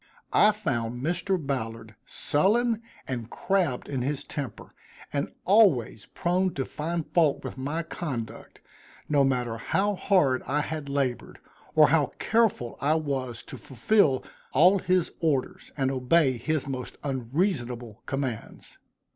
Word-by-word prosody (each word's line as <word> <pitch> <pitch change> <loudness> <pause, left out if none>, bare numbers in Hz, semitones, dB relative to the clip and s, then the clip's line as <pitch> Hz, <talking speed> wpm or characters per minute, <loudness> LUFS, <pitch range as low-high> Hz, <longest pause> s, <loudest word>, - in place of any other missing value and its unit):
I 210 - +6
found 125 - -3
Mr. 180 +4 0
Ballard 115 -7 -4
sullen 225 +8 +1 0.3
and 120 -3 -4
crabbed 180 -10 0
in 135 -3 -2
his 140 +2 -1
temper, 135 -7 -6 0.4
and 140 0 -1
always 180 - +4
prone 185 +1 0
to 135 - -1
find 165 +1 -3
fault 160 -5 +3
with - - -6
my 145 +5 -3
conduct 140 -9 -6 0.5
no 145 -2 +3
matter 125 -4 0
how 205 - +1
hard 180 -10 +2
I 145 +2 +1
had 150 -2 -5
labored, 140 -3 -2 0.4
or - - +7
how - - +2
careful 220 - +1
I 150 +3 +3
was 135 -6 -3
to - - -9
fulfil 205 - +2 0.3
all 180 +8 +6
his 185 -1 +1
orders, 150 -6 -1
and 135 -1 +1
obey 130 0 +2
his 155 +1 0
most 130 -2 -5
unreasonable 125 - -2
commands. 135 -5 -5
140 Hz, 130 wpm, -27 LUFS, 125-175 Hz, 0.5 s, or